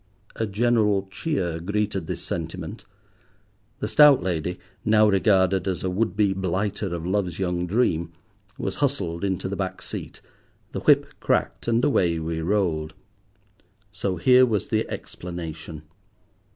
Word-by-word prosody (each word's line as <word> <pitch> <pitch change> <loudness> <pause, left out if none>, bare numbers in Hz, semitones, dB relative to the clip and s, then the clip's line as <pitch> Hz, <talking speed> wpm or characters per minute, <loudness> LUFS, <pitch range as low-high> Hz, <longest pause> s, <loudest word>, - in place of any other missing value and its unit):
A 110 - -1
general 105 -2 +2
cheer 95 - -2
greeted 100 -1 -2
this - - -4
sentiment. 85 0 -5 1.0
The - - -1
stout 135 +1 +6
lady, 90 0 -2 0.3
now 110 0 +5
regarded 95 -2 +3
as 90 -2 -2
a 95 - -1
would 105 +3 0
be 100 -2 +3
blighter 95 +1 -2
of 85 -1 -5
love's 95 -2 -1
young 90 -2 -1
dream, 85 -6 +1 0.5
was 95 - -3
hustled 100 - -1
into 95 -2 -1
the 100 - -3
back 95 -1 -3
seat, - - -7 0.5
the - - -3
whip - - +5
cracked, - - 0
and 115 +2 +2
away 90 - +2
we 80 0 -3
rolled. 80 -4 0 1.0
So 100 -2 -2
here 125 +8 +5
was 110 -6 +1
the - - 0
explanation. 80 -3 -7
95 Hz, 140 wpm, -24 LUFS, 85-105 Hz, 1.0 s, stout